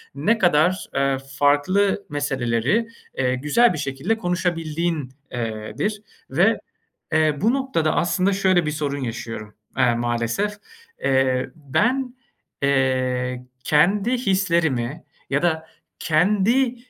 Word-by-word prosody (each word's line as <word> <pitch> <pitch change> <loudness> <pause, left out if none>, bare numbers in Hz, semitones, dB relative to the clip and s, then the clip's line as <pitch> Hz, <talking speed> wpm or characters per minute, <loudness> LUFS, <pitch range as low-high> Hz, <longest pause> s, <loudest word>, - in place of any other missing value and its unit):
ne 210 +12 +2
kadar, 175 0 +2
eee, 135 0 +2 0.2
farklı 185 +8 +2
meseleleri, 135 - 0 0.3
eee, 130 -1 +1
güzel 150 - +3
bir - - -4
şekilde 145 +11 -2
konuşabildiğin, 170 - -1 0.2
eee, 110 -3 -4
dir 210 0 -1 0.3
ve, - - +3 0.5
eee, 155 -2 +3
bu 225 +5 +3
noktada 265 - 0
aslında 185 +3 +1
şöyle 185 -3 +2
bir 150 - -1
sorun 145 -2 -2
yaşıyorum, 115 -3 -6 0.2
aaa, 125 -2 +3
maalesef, 120 - -1 0.5
eee. 130 -1 +2
Ben, 245 - 0 0.5
eee, 130 -2 0 0.2
kendi 195 +9 +3
hislerimi 170 - 0 0.3
ya 140 +1 +1
da 160 -2 0 0.3
kendi, 210 +10 +2
155 Hz, 110 wpm, -22 LUFS, 130-195 Hz, 0.5 s, güzel